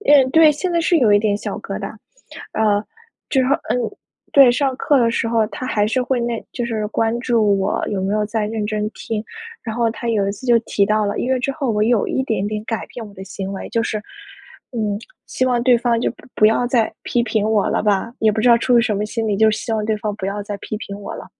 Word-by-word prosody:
因 295 - +5
为 270 - +6
对， 320 0 +7
现 350 +4 -3
在 340 - +2
是 340 +1 +3
有 220 -6 +4
一 205 - +6
点 205 -1 +1
小 - - -5
疙 - - -5
瘩。 - - -5 0.6
呃 210 -2 +2 0.5
之 265 -2 +2
后 275 +2 +3
呃 - - +1 0.6
对， 275 -3 +8
上 265 +1 0
课 285 +1 +2
的 230 -1 +3
时 230 - -1
候， 225 -2 +2
他 255 - -7
还 210 -4 +1
是 250 +3 0
会 250 0 0
那 235 -1 -2
就 245 - -3
是 215 -2 -2
关 225 +2 0
注 220 -5 +2
我 195 - -1
有 195 -2 -2
没 195 +2 -1
有 210 0 +1
在 220 0 -1
认 215 -1 -3
真 215 0 -2
听， 220 -2 -4 0.4
然 225 -2 -5
后 235 -1 +2
他 235 +1 -5
有 210 -4 +1
一 - - -1
次 205 - -11
就 235 -1 +5
提 200 -3 +1
到 215 0 +2
了 200 - -2
因 255 - -1
为 260 - +2
之 275 +2 -1
后 275 -4 -2
我 210 -1 +1
有 225 -1 +2
一 265 - 0
点 220 -6 -1
点 215 0 -3
改 225 -1 -3
变 230 -3 -8
我 205 - -13
的 190 - -9
行 195 0 -6
为， 195 - -6
就 230 - 0
是 220 -2 -2 0.7
嗯 210 -4 -1 0.3
希 255 - -1
望 245 -2 +1
对 245 -1 +5
方 235 -1 +1
就 - - 0
不 - - -18
不 215 - +5
要 225 +3 +2
再 235 -3 +1
批 240 - +1
评 215 -2 0
我 215 -2 +2
了 - - 0
吧， 210 +1 +1
也 220 -1 +3
不 220 - -1
知 245 - +3
道 235 -1 +6
出 245 +1 +2
于 - - +4
什 215 -3 0
么 210 - -1
心 225 0 -2
理， 205 - +1
就 220 +2 +5
希 220 +2 -4
望 215 -1 0
对 215 0 0
方 210 -1 -3
不 190 - -4
要 205 +1 -3
再 205 0 -5
批 215 - -5
评 200 -4 -7
我 - - -6
了。 - - -8
225 Hz, 290 characters per minute, -20 LUFS, 210-245 Hz, 0.7 s, 对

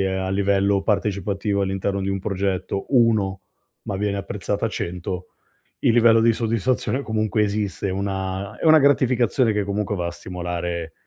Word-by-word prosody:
ehm, 95 0 0
a 95 - -2
livello 100 0 +2
partecipativo 100 -1 0
all'interno 95 +1 -1
di 95 - -2
un 95 -1 -1
progetto 95 -1 -2
1, 105 -6 +3 0.4
ma 100 - -4
viene 100 0 -1
apprezzata 100 +2 -2
100, 90 -1 -5 0.5
il 115 - +3
livello 115 -1 +5
di 115 +1 +4
soddisfazione 115 +4 -1
comunque 110 -2 0
esiste. 100 -1 -1
È - - -1
una 95 +1 -3
è - - -5
una 155 0 +7
gratificazione 130 -4 +3
che 105 -1 0
comunque 105 +1 -2
va 85 -1 -2
a - - -2
stimolare 85 -2 -4
100 Hz, 155 wpm, -22 LUFS, 95-110 Hz, 0.5 s, una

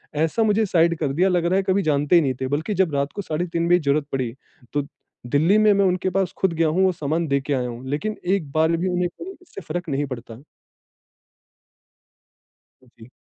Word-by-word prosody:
ऐसा 160 +9 +1
मुझे 215 0 +2
साइड 170 -3 +2
कर 145 -4 -1
दिया, 180 +6 +2
लग 175 -2 +1
रहा 175 +2 +2
है 195 - +1
कभी 190 +1 +1
जानते 150 +1 +2
ही 170 - +7
नहीं 135 -4 0
थे। 130 - -1
बल्कि 150 +10 -2
जब 185 -5 +1
रात 140 +1 -1
को 200 - -3
साढ़े 175 -1 -3
3 170 0 0
बजे 175 0 +5
ज़रूरत 145 -1 +1
पड़ी, 125 -4 -2 0.4
तो 145 - +1 0.5
दिल्ली 160 - +3
में 215 0 +5
मैं 200 0 +3
उनके 185 0 +1
पास 190 -1 -1
खुद 190 -3 +1
गया 165 0 +1
हूँ, 170 +5 +2
वो 190 - +3
सामान 165 0 -2
देके 140 0 0
आया 125 -2 -1
हूँ, 120 +2 -8
लेकिन 210 +10 -2 0.2
एक 155 -8 -5
बार 160 +2 +2
भी 180 +3 -1
उन्हें 180 0 0
कोई 375 +3 -8
इससे 365 - -11
फ़र्क 170 0 -5
नहीं 140 +1 -1
पड़ता। 120 -2 -8 2.6
जी। 115 0 -14
165 Hz, 215 wpm, -22 LUFS, 145-185 Hz, 2.6 s, ही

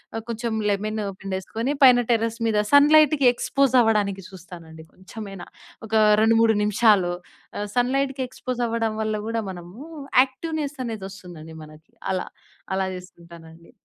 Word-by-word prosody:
ఆహ్, 225 - -4
కొంచెం 230 0 -3 0.2
లెమన్ 215 +2 -2 0.2
పిండేసుకొని 195 +7 -3
పైన 250 -2 +7
టెర్రస్ 230 0 0
మీద 210 -1 +1
సన్ 285 +1 +6
లైట్‌కి 305 -2 +4
ఎక్స్పోజ్ 260 +1 0
అవ్వడానికి 205 -4 0
చూస్తానండి 170 -4 -12
కొంచెమైనా. 195 0 -10 0.4
ఒక 220 - -12 0.3
2,3 225 0 +4
నిమిషాలు 210 -4 +3 0.5
ఆహ్, 205 - -3
సన్ 245 +1 +1
లైట్‌కి 270 -1 -1
ఎక్స్పోజ్ 255 -1 -5
అవ్వడం 225 -1 -2
వల్ల 215 0 -1
కూడా 230 0 -1
మనము 175 +4 -11 0.4
యాక్టివ్ 270 +5 -6
నెస్ 290 0 -5
అనేది 220 -4 -5
వస్తుందండి 175 -4 -12
మనకి. 155 +1 -16 0.2
అలా 185 - -2 0.5
అలా 190 0 -1
చేసుకుంటానండి. 170 -2 -15
215 Hz, 140 wpm, -23 LUFS, 185-245 Hz, 0.5 s, పైన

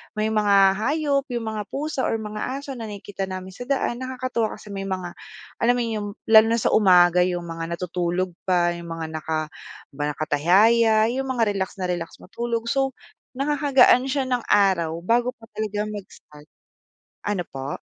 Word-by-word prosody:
may 215 +1 0
mga 210 -2 +3 0.2
hayop, 280 +2 0
'yong 240 -2 -3
mga 210 -1 -5
pusa 280 -1 -2
or - - 0
mga 210 -1 -5 0.2
aso 280 0 -6
na 225 - -5
nakikita 200 -1 -6
namin 185 0 -6
sa 245 +6 -9
daan 265 -3 -1
nakakatuwa 255 -3 -2
kasi 210 - -12
may 195 0 -4
mga, 185 -2 -3 0.5
alam 240 +1 +4
mo 245 - 0
'yon, 230 - -3
'yong 205 0 -4 0.2
lalo 220 0 +9
na 230 +1 +1
sa - - +2
umaga 180 -4 +5
'yong 175 -1 -2
mga 165 0 -5
natutulog 180 +1 -2 0.2
pa, 175 -2 +3
'yong 170 0 -7
mga 165 -1 -5
naka, 155 0 -3 0.4
'di 140 - -21
ba, - - 0
nakatihaya, 205 +10 +4 0.2
'yong 270 +2 -2
mga 250 -3 +1
relax 190 -1 -3
na 185 -2 -2
relax 170 -1 -4
matulog. 235 +3 -3
So, 270 -2 0 0.4
nakakagaan 275 -2 +4
siya 270 0 0
ng 250 -2 -2
araw, 185 -6 +3
bago 240 +5 +1
pa 225 - -25
talaga 210 -1 -2
mag-start. 150 -7 -11 0.8
Ano 205 -3 -1
po? 135 +1 -6
210 Hz, 175 wpm, -23 LUFS, 180-245 Hz, 0.8 s, lalo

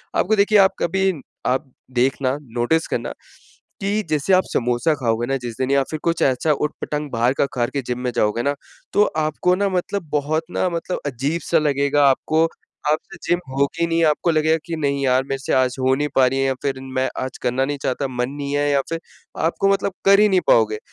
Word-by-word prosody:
आपको 220 +4 +2
देखिए, 205 +1 +4
आप 195 -1 +6
कभी 190 +2 +1 0.4
आप 130 +1 -1 0.3
देखना, 130 +1 +1
नोटिस 125 +5 0
करना - - -3 0.7
कि 205 +2 0
जैसे 155 +5 +1
आप 185 - +5
समोसा 125 +6 +1
खाओगे 120 -3 0
ना 135 0 0
जिस 120 -2 -6
दिन 130 +1 -1
या 140 -1 +4
फिर 155 - -3
कुछ 170 -1 0
ऐसा 135 +4 +2
उट-पटाँग 150 0 -3
बाहर 120 +2 +2
का - - +4
खा 120 - +1
के 140 - -3
जिम 125 0 -3
में 125 -1 -2
जाओगे 105 +2 +1
ना, 140 - +1 0.4
तो 205 - +5
आपको 155 +4 +1
ना 200 +1 0
मतलब 185 +1 -2
बहुत 150 +2 0
ना 185 - 0
मतलब 170 +1 -3
अजीब-सा 150 +6 0
लगेगा 140 -1 +2
आपको। 155 +4 +2 0.5
आप 155 - +2
से - - -9
जिम 175 - +2 0.2
होगी 140 +5 +1
नहीं, 165 0 +1
आपको 155 +2 +2
लगेगा 160 +1 +2
कि 170 - -4
नहीं 140 -2 -1
यार, 130 +1 +3
मेरे 135 0 -4
से 135 - -2
आज 130 -1 +2
हो 130 0 +3
नहीं 145 +1 -1
पा 130 -1 +5
रही 135 +1 -1
है 135 - +2
या 135 - +1
फिर 135 -2 -1 0.2
मैं 130 - +1
आज 130 - -6
करना 125 +2 +1
नहीं 145 +1 -3
चाहता, 135 +2 -1
मन 125 -1 -2
नहीं 145 0 -4
है 145 0 +1
या 140 -1 +3
फिर 165 0 -2 0.5
आपको 195 +4 +1
मतलब 195 -1 -1
कर 200 +1 +6
ही 210 - +5
नहीं 190 -2 +4
पाओगे। 110 -2 +3
145 Hz, 215 wpm, -21 LUFS, 130-165 Hz, 0.7 s, आप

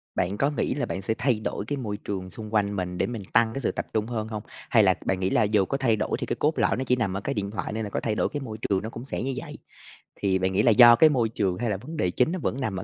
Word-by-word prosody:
Bạn 95 +3 -1
có 140 - +2
nghĩ 145 - -1
là 145 - -1
bạn 95 - -4
sẽ 105 +4 -1
thay 120 -4 +1
đổi 105 -1 -4
cái 145 +5 -3
môi 105 -6 -4
trường 95 -3 -5
xung 110 +3 -9
quanh 100 -1 +1
mình 90 -1 -3
để - - +1
mình 115 -5 -5
tăng 115 0 +4
cái 135 - -4
sự - - 0
tập - - -4
trung 110 0 0
hơn 110 -2 -3
hông? 105 -2 -5 0.3
Hay - - +5
là - - +5
bạn 95 - 0
nghĩ 95 0 0
là - - +3
dù 105 -2 +2
có 135 - -2
thay 125 -5 +2
đổi 110 0 -1
thì - - -2
cái - - -2
cốt 155 +2 0
lõi - - +2
nó 130 - -1
chỉ 125 -1 +2
nằm 110 -6 -1
ở - - -4
cái 135 - -2
điện 100 -3 -3
thoại, 105 0 -4
nên 110 - -2
là 105 - -4
có - - -2
thay 110 -2 -1
đổi - - +1
cái 145 - -4
môi 110 -5 -6
trường 100 -3 0
nó 110 - -4
cũng 115 +2 -8
sẽ - - -4
như 135 - -2
vậy? - - -7 0.6
Thì 95 -2 0
bạn 95 +1 0
nghĩ 100 - +3
là 120 - +5
do 120 +1 +9
cái 155 +6 +6
môi 120 -6 +1
trường, 95 -5 -1
hay 120 -1 -1
là 100 - -1
vấn 150 - -8
đề 90 - +1
chính 125 - +2
nó 185 - -2
vẫn 135 - -2
nằm 105 -7 -2
ở 95 - -4
110 Hz, 340 wpm, -26 LUFS, 100-125 Hz, 0.6 s, do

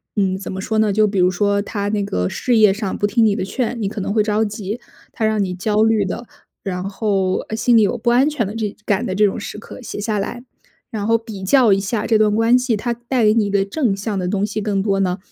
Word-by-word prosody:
嗯， 190 -3 +1
怎 195 - -7
么 190 - -4
说 220 +3 -2
呢， 215 -2 +2
就 215 +1 +4
比 200 -1 -3
如 180 0 +4
说 200 +2 +1
他 205 -1 -3
那 205 -1 0
个 90 - -1
事 245 - 0
业 215 -3 +6
上 200 -1 -3
不 - - 0
听 225 +2 +3
你 210 -2 +3
的 205 - -2
劝， 235 +3 -3
你 200 - -1
可 215 - -6
能 200 +1 -2
会 215 - +3
着 215 +1 +1
急。 210 +1 -5 0.3
他 220 - -2
让 215 -1 +1
你 185 -2 -3
焦 210 +3 0
虑 220 -2 +2
的， 230 +5 -5 0.3
然 185 -1 -4
后， 195 -2 0
呃， 220 - -2
心 235 +2 +3
里 225 - +6
有 205 - +1
不 240 - +1
安 260 +5 +4
全 290 -7 -1
的 205 +3 -6
这 215 -3 -3
感 205 +2 +1
的 185 - -2
这 210 +2 +4
种 200 - -1
时 205 - -7
刻 220 - -11
写 230 - -7
下 210 0 -1
来， 240 +5 -5 0.5
然 210 -2 -3
后 230 0 +4
比 220 -3 -9
较 235 +1 +5
一 195 - +2
下 205 +3 -2
这 220 -2 +3
段 210 -1 +3
关 225 +2 +4
系， 250 -3 0
它 240 +3 -2
带 240 0 -1
给 210 - +5
你 215 -3 +1
的 200 -1 +1
正 215 -2 -1
向 205 0 -3
的 180 - -2
东 200 +1 0
西 215 +1 -4
更 200 -2 -1
多 195 -2 +1
呢， 185 -1 0
210 Hz, 295 characters per minute, -19 LUFS, 195-225 Hz, 0.5 s, 业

